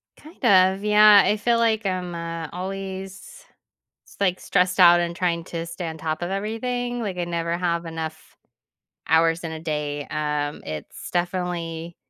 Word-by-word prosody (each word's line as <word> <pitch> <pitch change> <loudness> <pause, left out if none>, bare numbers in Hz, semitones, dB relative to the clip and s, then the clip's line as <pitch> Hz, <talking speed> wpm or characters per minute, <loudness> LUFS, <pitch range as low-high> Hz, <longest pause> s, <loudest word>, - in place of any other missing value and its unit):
Kind 310 -2 -17
of, 190 -2 +5
yeah. 210 -1 +7
I 210 - +2
feel 235 +3 +2
like 225 -2 +1
I'm, 180 -2 -2
uh, 165 -1 -5
always, 195 - -7 0.6
s - - -18
like, 185 -2 +1
stressed 185 0 +1
out 175 -1 +8
and 170 0 -2
trying 170 -2 -1
to 165 0 -5
stay 170 +1 -6
on 160 0 -7
top 155 +1 -3
of 175 - -2
everything. 240 +4 -3
Like, 195 -5 -4
I 175 - 0
never 170 0 -2
have 170 -1 -1
enough 160 -1 -7 0.7
hours 165 +1 +3
in 165 - -3
a 160 - -6
day. 150 -2 -3
Um, 150 -1 -2
it's 75 -1 -7
definitely 175 -2 -3
175 Hz, 165 wpm, -23 LUFS, 165-195 Hz, 0.7 s, out